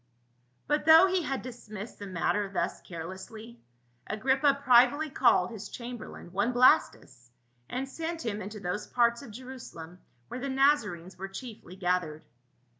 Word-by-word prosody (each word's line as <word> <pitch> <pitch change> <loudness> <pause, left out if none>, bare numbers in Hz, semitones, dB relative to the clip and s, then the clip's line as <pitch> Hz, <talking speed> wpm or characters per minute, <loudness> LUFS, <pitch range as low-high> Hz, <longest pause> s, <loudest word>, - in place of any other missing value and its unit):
But 295 0 0
though 325 +3 +9
he 375 -1 +1
had 275 -4 -3
dismissed 225 -4 -9
the 205 - -7
matter 195 +2 -1
thus 180 -3 -2
care 165 -3 -7
lessly, 215 +6 -9 0.5
Agrippa 265 +6 +2
privily 260 +4 +5
called 190 -9 +3
his 220 -3 -8
chamberlain, 240 -7 -8
one 200 +6 +1
Blastus, 130 - +3 0.4
and 265 +2 -3
sent 325 +2 -5
him 215 -2 -2
into 210 +2 -7
those 180 +2 -4
parts 235 0 +2
of 275 - -10
Jerusalem 215 -8 -10 0.3
where 250 - -6
the 275 +2 -4
Nazarenes 265 - +1
were 195 - -4
chiefly 195 -2 -9
gathered. 180 -4 -1
230 Hz, 145 wpm, -29 LUFS, 190-265 Hz, 0.5 s, though